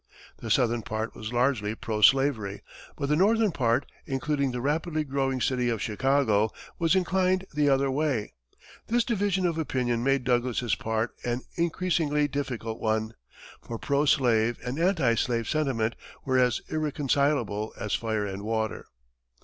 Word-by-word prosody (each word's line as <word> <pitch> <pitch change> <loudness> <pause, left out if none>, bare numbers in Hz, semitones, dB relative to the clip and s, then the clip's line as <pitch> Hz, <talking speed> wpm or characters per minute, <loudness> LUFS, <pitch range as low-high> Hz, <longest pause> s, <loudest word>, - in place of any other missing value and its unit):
The - - -7
southern 120 -1 +2
part 110 +1 -4
was 110 0 -6
largely 120 -4 +1
pro 110 -1 -3
slavery, 115 -6 +3 0.3
but 140 - -2
the 150 - +2
northern 215 +4 +3
part, 120 -2 +1 0.2
including 140 0 0
the 125 - -3
rapidly 155 +4 -1
growing 135 -2 -1
city 125 -1 +1
of 115 -2 -1
Chicago, 110 -1 +2 0.3
was 170 +1 +3
inclined 185 0 +1
the 145 -1 +2
other 135 0 +2
way. 135 -6 -1 0.5
This 240 +1 +2
division 200 -5 0
of 165 -2 0
opinion 125 -5 -1
made 135 0 +2
Douglas's 120 -2 0
part 110 +1 -1
an 120 +1 -1
increasingly 165 -3 +1
difficult 125 -5 -4
one, 110 0 -1 0.5
for 115 - -6
pro 140 +5 +1
slave 120 -5 +3
and 125 +5 -3
anti 165 -9 +3
slave 115 -1 0
sentiment 130 -7 0 0.3
were 130 -1 +2
as 125 -2 +2
irreconcilable 140 -7 0
as 105 - -3
fire 110 -2 -1
and 100 0 -5
water. 110 0 -2
130 Hz, 150 wpm, -27 LUFS, 115-150 Hz, 0.5 s, slavery